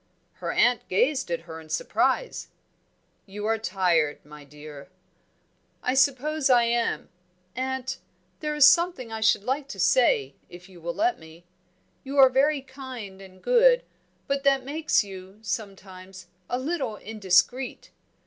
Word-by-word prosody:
Her - - -2
aunt 245 -1 +2
gazed 260 +6 +1
at 170 -1 -2
her 160 -1 -10
in 155 - -16
surprise. - - -1 0.8
"You 205 +2 -7
are 225 0 0
tired, 175 -8 +1
my 150 0 -13
dear." 145 +1 -12 0.9
"I 250 - 0
suppose 275 +2 +2
I 245 -2 +5
am 235 0 -1 0.5
Aunt, 260 0 -3 0.4
there 300 -1 -3
is 295 -2 +7
something 310 -6 +3
I 220 0 -5
should 220 -2 +3
like 270 +4 -2
to 205 -8 -9
say, 185 - +3 0.2
if 175 +1 -13
you 180 -3 -16
will 170 +1 -4
let 355 +2 +1
me. 160 +2 -15 0.6
You 275 +1 -6
are 265 -1 +8
very 275 +2 +2
kind 260 -8 -9
and 185 -1 -15
good, - - +4 0.4
but 275 0 -2
that 275 -2 +2
makes 300 -1 +1
you, 190 0 -11
sometimes, 190 -2 -7 0.2
a 245 - -1
little 265 -4 -3
indiscreet. 210 +4 0
230 Hz, 145 wpm, -25 LUFS, 185-275 Hz, 0.9 s, are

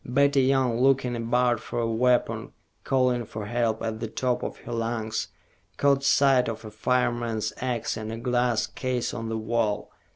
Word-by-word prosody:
Betty 140 +2 +3
Young, 130 -3 +2
looking 130 -2 +3
about 120 0 +1
for 120 - -7
a 120 - +1
weapon, 120 +2 +1 0.3
calling 125 -2 +2
for 110 -1 -7
help 115 0 -1
at 110 -1 -3
the 115 - -3
top 125 +2 -1
of - - -5
her - - -8
lungs, 115 -1 -2 0.5
caught 140 -1 +3
sight 135 -1 +4
of 115 0 -6
a 110 - -8
fireman's 120 -1 0
ax 125 -3 -2
in 110 0 -5
a 115 - -4
glass 120 -1 +1
case 125 -2 -3
on 115 -2 -4
the 110 - -2
wall. 110 -2 -1
120 Hz, 170 wpm, -26 LUFS, 115-125 Hz, 0.5 s, sight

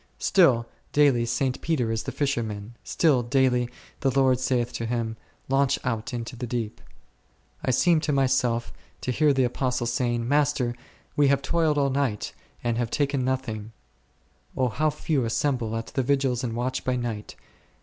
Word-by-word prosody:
Still 130 -12 +4 0.3
daily 135 -5 +4
St. 125 +2 -1
Peter 130 -9 0
is 110 0 -1
the - - -5
fisherman; 115 -6 -2
still 150 -7 +2
daily 125 -1 +2 0.3
the 135 - +2
Lord 130 -1 +3
saith 125 -2 0
to 115 - -3
him, 115 -1 -2 0.3
Launch 135 0 +2
out 115 -4 -2
into 120 0 -5
the 125 +1 -5
deep, 115 -3 -3 0.8
I - - -1
seem 160 +6 +4
to 150 -1 -1
myself 125 - +1 0.3
to 125 - -1
hear 150 +3 +3
the 135 -1 +2
Apostles 125 -1 -1
saying, 120 -1 0
Master, 140 -3 +2 0.4
we 145 -1 +4
have 140 0 +2
toiled 160 -1 +1
all 140 -1 +2
the 135 - 0
night, 120 -7 -1 0.3
and 120 -1 0
have 120 -2 -1
taken 140 0 0
nothing, 115 -4 -3 0.8
O 130 -1 +2
how 155 +8 +1
few 150 -2 -1
assemble 115 -1 0
at 115 - -4
the 135 - +1
Vigils 135 -1 +1
and 120 -2 -2
watch 125 +2 -2
by 130 - 0
night 115 -4 -4
125 Hz, 170 wpm, -26 LUFS, 120-140 Hz, 0.8 s, Still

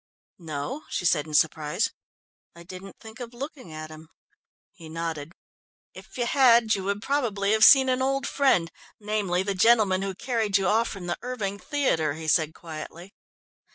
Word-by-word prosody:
"No," 165 - -5
she - - -3
said 155 -3 +2
in 155 - -4
surprise. 160 +5 +1 0.6
"I 170 - -12
didn't 185 +2 -11
think 220 +2 -12
of 240 -1 -8
looking 265 - -8
at 155 0 -8
him." 155 0 -13 0.6
He 165 -5 -13
nodded. 165 -2 -5 0.6
"If - - -13
you 240 - 0
had, 235 -4 +4
you 190 -1 -2
would 200 +2 -2
probably 220 -8 0
have 220 0 +3
seen 265 -1 +8
an 255 0 +1
old 275 +1 0
friend, 260 -12 +2 0.3
namely, 205 -4 -1
the 200 0 -2
gentleman 200 -2 +3
who 195 -1 -3
carried 220 -3 0
you 195 - -1
off 225 +5 +2
from 195 -3 -7
the 175 -1 -3
Erving 210 -6 -4
Theatre," 165 - 0
he 160 0 -7
said 160 0 +2
quietly. 165 +3 -9
195 Hz, 170 wpm, -26 LUFS, 165-235 Hz, 0.6 s, seen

